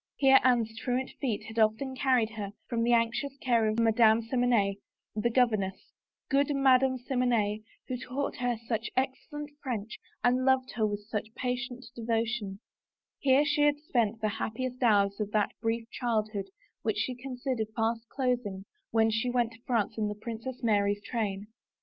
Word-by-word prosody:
Here 270 -1 +6
Anne's 235 -3 +2
truant 255 +1 -1
feet 235 -7 -1
had 220 +1 -5
often 220 +5 +2
carried 255 -4 +2
her 205 -2 -5
from 235 -2 -1
the 235 +1 +2
anxious 235 +4 +1
care 235 -3 +2
of 215 +1 0
Madame 225 0 +4
Simonette, 230 -5 +2 0.4
the 220 +2 +1
governess 215 -6 +1 0.2
— - - -64
good 280 +1 +3
Madame 265 -1 +4
Simonette, 240 -5 0 0.3
who 255 - -2
taught 255 +3 -3
her 245 -1 0
such 225 -1 -1
excel 270 +3 -2
lent 295 0 -7
French 230 -4 -4 0.2
and 250 +1 +3
loved 260 -1 +2
her 220 -2 +1
with 205 0 -5
sucfi 220 0 -4
patient 250 0 -3
devotion 225 -3 -2 0.3
— - - -64
here 275 +1 +4
she 295 0 +1
had 295 0 +4
spent 230 -7 0
the 215 - +1
happiest 255 +3 -3
hours 200 -4 +3
of 210 -1 -1
that 210 -1 +2
brief 225 0 -1
child 220 -4 -1
hood 195 -2 -3 0.3
which 220 -2 -1
she 250 +4 0
considered 250 -2 -3
fast 225 0 -1
closing 245 -8 -1 0.2
when 225 0 +3
she 225 +3 0
went 240 -2 +1
to 225 0 -16
France 230 -4 0
in 210 - +1
the 210 - -3
Princess 235 +4 -6
Mary's 205 -2 +2
train. 205 -4 -2
235 Hz, 175 wpm, -29 LUFS, 215-255 Hz, 0.4 s, Here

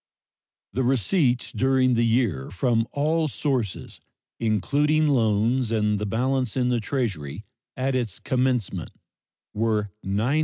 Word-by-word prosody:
The 130 - 0
receipts 125 - +1
during 130 -1 +2
the 120 0 +2
year 115 - +1
from 115 +3 +1
all 155 +3 +1
sources, 130 -8 -2 0.4
including 145 +8 +2
loans 115 -2 +2
and 105 -2 0
balance 130 +2 0
in 125 -1 +2
the 120 -1 +1
Treasury 105 - -3 0.3
at 130 +1 0
its 120 -7 -2
commencement, 125 -4 -1 0.6
were 105 -2 0
$901,125,674. 110 +10 +1
120 Hz, 115 wpm, -25 LUFS, 105-130 Hz, 0.6 s, during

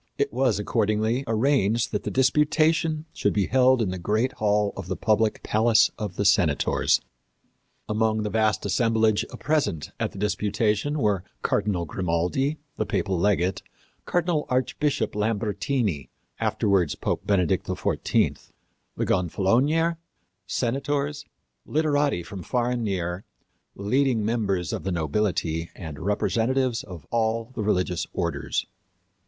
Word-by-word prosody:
It - - 0
was, 125 -4 +2
accordingly, 110 +4 0
arranged 115 -1 +2
that - - -1
the - - -3
disputation 155 +4 +2
should 100 - 0
be 100 -2 +1
held 130 0 +4
in 95 - -1
the 95 - -4
great 110 +8 0
hall 105 -3 +1
of 95 -3 -7
the 95 - -2
public 110 0 +1
Palace 110 +1 +4
of 105 -4 -5
the 100 - -1
Senators. 80 -7 +3 0.9
Among 110 0 +1
the 105 - -3
vast 110 -2 +1
assemblage 110 0 +2 0.2
present 105 - 0
at - - -1
the - - -12
disputation 105 +6 0
were 105 -9 +1 0.2
Cardinal 100 -4 0
Grimaldi, 90 - -1 0.2
the 110 - 0
papal 95 -2 0
legate; 95 0 +1 0.4
Cardinal 175 -3 0
Archbishop 130 -1 0
Lambertini, 105 - -1 0.3
afterwards 90 -7 +1
Pope - - -3
Benedict 90 -5 +1
XIV; - - 0 0.5
the - - 0
gonfalonier, 125 - +2 0.5
senators, 140 +3 -1 0.4
literati 145 - +1
from 95 +3 -8
far 120 +6 0
and 120 -1 -1
near, 90 -2 -2 0.5
leading 115 +2 +1
members 100 -7 -1
of - - -4
the 95 - -2
nobility 85 -1 -1
and 80 -4 -8
representatives 115 +6 0
of 85 -7 -10
all 115 +1 0
the 110 - -4
religious 90 -4 0
orders. - - -2
110 Hz, 125 wpm, -25 LUFS, 95-130 Hz, 0.9 s, held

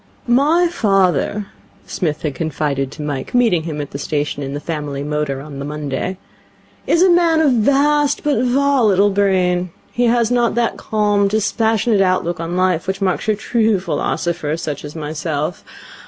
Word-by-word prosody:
'My 295 +8 +3
father,' 195 - +1 0.4
Psmith 155 -4 -3
had 150 -3 -1
confided 145 -3 -2
to 150 - -7
Mike, 145 - -4
meeting 230 -9 +3
him 155 -2 -5
at 145 - -5
the 140 - -6
station 145 0 -2
in 140 0 -4
the - - -3
family 150 -3 -4
motor 150 -2 -2
on 140 -1 -9
the - - -4
Monday, 150 +4 -4 0.7
'is 340 - +4
a 375 - +5
man 340 -2 +4
of 305 -4 +4
vast 280 +4 +2
but 285 -5 +1
volatile 245 -7 +3
brain. 185 -2 +1 0.2
He 245 - 0
has 235 0 +2
not 240 -2 +2
that 235 -1 0
calm, 205 -2 +1
dispassionate 220 +1 +1
outlook 185 -3 0
on 165 +2 -3
life 185 -2 +1
which 190 0 -2
marks 190 +1 -1
your 215 - +2
true 220 -1 +1
philosopher, 170 -2 -2
such 150 -3 -5
as 150 +1 -8
myself. 155 +1 -3
185 Hz, 165 wpm, -18 LUFS, 150-235 Hz, 0.7 s, a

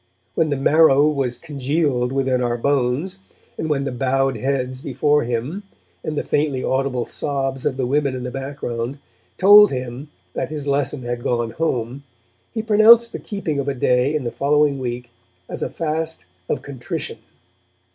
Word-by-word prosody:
When 160 -1 +1
the 145 - 0
marrow 145 0 +5
was 135 -5 -1
congealed 140 -4 -1
within 135 -2 +1
our 120 -1 0
bones, 140 +8 0 0.4
and 160 - -3
when 140 -2 +1
the 135 - -3
bowed 135 +1 0
heads 130 +1 -2
before 145 +3 +1
him, 125 - -3 0.4
and 155 -1 -3
the - - 0
faintly 145 -3 0
audible 130 -2 0
sobs 135 -2 -2
of 130 - -2
the 130 - 0
women 140 +1 +1
in 125 - -5
the 125 - -4
background, 135 -2 -4 0.4
told 205 +2 +8
him 130 +2 -5 0.2
that - - -3
his 150 -2 -5
lesson 140 -1 -1
had 120 0 -3
gone 120 -2 -1
home, 130 -2 -2 0.5
he 220 -2 -3
pronounced 225 +2 +6
the - - -5
keeping 170 -8 -3
of 140 - -2
a 140 - -1
day 125 +3 +2
in 150 - -1
the 120 - -3
following 145 0 +2
week 120 -1 -5 0.4
as - - -6
a - - -1
fast 160 - -3 0.2
of - - -1
contrition. 130 -4 -6
135 Hz, 165 wpm, -21 LUFS, 125-150 Hz, 0.5 s, told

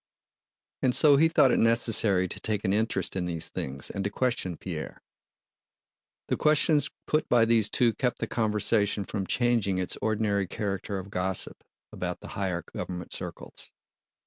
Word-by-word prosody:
And 125 -2 +2
so 145 -3 +5
he 160 +3 +5
thought 150 -5 +4
it - - +2
necessary 115 -5 +3
to - - -7
take 105 -2 -2
an 95 - +2
interest 105 -4 -1
in 90 -2 -1
these 85 -2 0
things 70 0 -5
and 100 - -4
to 100 - -1
question 110 -7 -2
Pierre. - - -7 1.2
The - - 0
questions 150 -1 +3 0.2
put 155 +1 0
by 120 -2 +5
these 115 -2 +2
two 120 -2 +2
kept 125 +2 -1
the - - -2
conversation 105 -2 +1
from 95 -2 -4
changing 115 -6 +1
its 90 -1 -3
ordinary 105 -3 0
character 100 +1 -3
of 95 +1 -8
gossip 90 -1 -2 0.3
about - - -4
the - - -10
higher 90 -3 -3
government 90 -1 -5
circles. - - -7
105 Hz, 160 wpm, -27 LUFS, 95-120 Hz, 1.2 s, so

